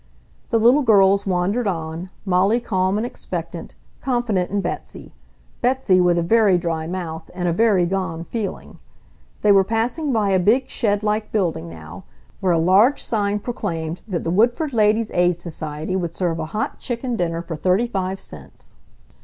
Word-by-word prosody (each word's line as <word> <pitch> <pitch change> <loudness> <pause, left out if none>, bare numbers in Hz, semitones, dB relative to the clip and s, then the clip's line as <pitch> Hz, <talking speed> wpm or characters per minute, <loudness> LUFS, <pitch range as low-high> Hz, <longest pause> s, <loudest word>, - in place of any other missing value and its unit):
The 230 - +2
little 240 +6 +5
girls 200 -4 +4
wandered 195 +6 0
on, 165 0 -4 0.2
Molly 195 +5 +3
calm 190 -4 0
and 220 - -1
expectant, 245 - -6 0.3
confident 240 -8 0
in 205 - -1
Betsy; 175 - -6 0.5
Betsy 245 -7 +3
with 175 -1 +3
a 170 - +1
very 210 0 +4
dry 165 -2 -2
mouth 165 -3 -5
and 180 -1 -2
a 170 - +1
very 200 -2 +3
gone 170 -3 -2
feeling. 205 +1 -5 0.6
They 210 - +5
were 195 -1 +6
passing 235 - -1
by 215 -4 +1
a 190 - +3
big 220 +9 +2
shed 205 -3 0
like 210 0 -1
building 170 - -1
now, 80 -1 -11 0.3
where 185 - +1
a - - +3
large 195 - +4
sign 205 -2 0
proclaimed 165 -7 -4
that 185 -5 -3
the 165 - -1
Woodford 240 - +2
Ladies' 215 0 +2
Aid 175 -1 +2
Society 155 0 -5
would 170 -3 -3
serve 170 -3 -1
a 160 - -2
hot 215 +5 -3
chicken 245 0 -3
dinner 170 -4 -2
for 165 - -5
thirty 185 +8 +2
five 190 -4 -3
cents. 70 -4 -11
190 Hz, 170 wpm, -21 LUFS, 170-220 Hz, 0.6 s, were